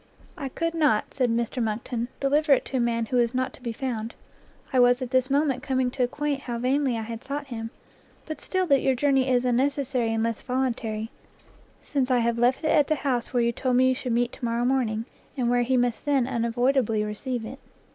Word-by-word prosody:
"I 280 Hz, -6 st, -5 dB
could 330 Hz, +5 st, -2 dB
not," 295 Hz, -10 st, +1 dB
said 255 Hz, -3 st, +1 dB
Mr 235 Hz, +2 st, -1 dB
Monckton, 230 Hz, +2 st, -2 dB
"deliver 290 Hz, +2 st, +3 dB
it 265 Hz, -, +2 dB
to 265 Hz, -, -2 dB
a -, -, +1 dB
man 230 Hz, -1 st, 0 dB
who 250 Hz, -, -1 dB
was 240 Hz, 0 st, +2 dB
not 255 Hz, 0 st, -1 dB
to -, -, -15 dB
be 240 Hz, -2 st, -3 dB
found; 230 Hz, -2 st, -4 dB, 0.6 s
I 260 Hz, -, +4 dB
was 245 Hz, 0 st, +5 dB
at 255 Hz, -2 st, -5 dB
this 260 Hz, 0 st, +2 dB
moment 275 Hz, -2 st, +1 dB
coming 260 Hz, -2 st, 0 dB
to 255 Hz, -, -4 dB
acquaint 280 Hz, +3 st, -1 dB
how 240 Hz, -3 st, -4 dB
vainly 255 Hz, 0 st, +1 dB
I 225 Hz, -, -3 dB
had 230 Hz, +1 st, -7 dB
sought 285 Hz, +1 st, -4 dB
him; 225 Hz, -2 st, -5 dB, 0.6 s
but 310 Hz, -, -6 dB
still 375 Hz, -1 st, 0 dB
that 280 Hz, -6 st, +3 dB
your 265 Hz, -, +2 dB
journey 270 Hz, 0 st, +2 dB
is 250 Hz, -1 st, +2 dB
unnecessary 255 Hz, -1 st, +1 dB
unless 225 Hz, 0 st, -1 dB
voluntary, 235 Hz, -4 st, -2 dB, 0.7 s
since 275 Hz, -3 st, -1 dB
I 255 Hz, -, +4 dB
have 235 Hz, 0 st, +1 dB
left 250 Hz, +5 st, +2 dB
it 310 Hz, -, +1 dB
at 290 Hz, -2 st, +4 dB
the 310 Hz, -, +2 dB
house 250 Hz, -4 st, 0 dB
where 245 Hz, -2 st, +2 dB
you 235 Hz, -, +2 dB
told 250 Hz, +1 st, -1 dB
me 260 Hz, +1 st, +5 dB
you -, -, +3 dB
should 255 Hz, -2 st, -3 dB
meet 240 Hz, +1 st, +1 dB
to -, -, -14 dB
morrow 235 Hz, +1 st, 0 dB
morning, 235 Hz, -4 st, 0 dB, 0.3 s
and 240 Hz, -2 st, +1 dB
where 245 Hz, 0 st, +3 dB
he 255 Hz, +2 st, +1 dB
must 245 Hz, -2 st, 0 dB
then 275 Hz, -4 st, +2 dB
unavoidably 235 Hz, -2 st, +1 dB
receive 225 Hz, +3 st, -4 dB
it." 255 Hz, +5 st, -8 dB
250 Hz, 220 wpm, -26 LUFS, 235-270 Hz, 0.7 s, was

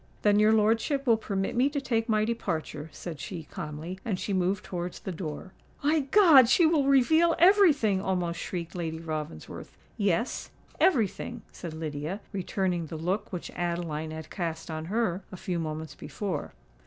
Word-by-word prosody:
"Then 205 Hz, 0 st, +5 dB
your 215 Hz, +1 st, +5 dB
lordship 225 Hz, +6 st, +2 dB
will 235 Hz, -3 st, +5 dB
permit 200 Hz, -2 st, -2 dB
me 255 Hz, +4 st, +3 dB
to 285 Hz, 0 st, -2 dB
take 235 Hz, -4 st, -1 dB
my 215 Hz, -1 st, +3 dB
departure," 160 Hz, -9 st, -3 dB
said 160 Hz, 0 st, -7 dB
she, 165 Hz, +3 st, -6 dB
calmly; 155 Hz, +5 st, -7 dB
and 205 Hz, -6 st, -2 dB
she 200 Hz, -, -2 dB
moved 185 Hz, +1 st, +1 dB
towards 175 Hz, -1 st, -4 dB
the 190 Hz, -, -5 dB
door. 165 Hz, +1 st, -6 dB, 0.3 s
"My 305 Hz, +2 st, +3 dB
God! 280 Hz, -, +7 dB
she 335 Hz, +5 st, +5 dB
will 315 Hz, -3 st, +3 dB
reveal 315 Hz, +5 st, +4 dB
every 385 Hz, 0 st, +7 dB
thing!" 215 Hz, -9 st, +1 dB
almost 180 Hz, -3 st, -1 dB
shrieked 170 Hz, -2 st, -5 dB
Lady 165 Hz, -3 st, -3 dB
Ravensworth. 155 Hz, -, -6 dB, 0.2 s
"Yes—every 215 Hz, -, +1 dB
thing," 235 Hz, +4 st, -8 dB
said 165 Hz, -3 st, -7 dB
Lydia, 155 Hz, +4 st, -4 dB
returning 180 Hz, -3 st, -1 dB
the 160 Hz, -, -6 dB
look 190 Hz, +6 st, -2 dB
which 180 Hz, -3 st, -5 dB
Adeline 170 Hz, -3 st, -3 dB
had 160 Hz, 0 st, -8 dB
cast 165 Hz, -3 st, -4 dB
on 155 Hz, 0 st, -4 dB
her 195 Hz, -1 st, 0 dB
a 185 Hz, -, -7 dB
few 180 Hz, -2 st, -3 dB
moments 155 Hz, -2 st, -4 dB
before. 190 Hz, -3 st, -5 dB
190 Hz, 165 wpm, -28 LUFS, 165-230 Hz, 0.3 s, God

